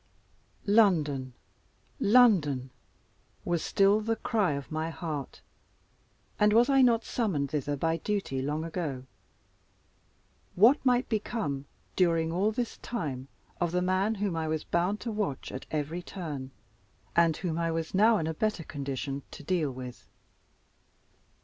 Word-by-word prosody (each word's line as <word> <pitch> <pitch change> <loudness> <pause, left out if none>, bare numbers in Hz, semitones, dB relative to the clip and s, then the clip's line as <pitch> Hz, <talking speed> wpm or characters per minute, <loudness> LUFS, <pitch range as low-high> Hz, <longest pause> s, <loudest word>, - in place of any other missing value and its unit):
London! 155 - +3 0.7
London! 175 - +4 0.7
was 170 -2 0
still 200 +2 +3
the 225 +1 0
cry 215 -6 0
of 140 +1 -6
my 155 +1 -2
heart; 155 -5 -5 1.0
and 210 0 +4
was 235 +4 +5
I 270 -1 +5
not 235 -3 +4
summoned 165 - -1
thither 145 -1 -1
by 165 +3 0
duty 190 -8 -2
long 150 +3 -2
ago? 155 -6 -4 1.5
What 235 +10 +5
might 250 -1 +3
become, 205 - -2 0.3
during 165 -3 +2
all 195 +5 +1
this 235 +1 -3
time, 140 - -4 0.3
of 175 -2 0
the 180 +1 +1
man 190 +4 +1
whom 200 -4 -1
I 160 -1 -2
was 155 -1 -1
bound 180 +5 0
to 230 - -3
watch 205 -11 -3
at 130 - -7
every 155 +3 -2
turn, 155 -8 -6 0.7
and 165 -2 +4
whom 170 -3 -2
I 165 0 0
was 165 -1 -3
now 215 +4 +5
in 160 - -1
a 160 - -2
better 215 0 -1
condition 140 -1 -4
to - - -10
deal 165 -2 0
with? 125 -1 -9
170 Hz, 140 wpm, -29 LUFS, 145-210 Hz, 1.5 s, was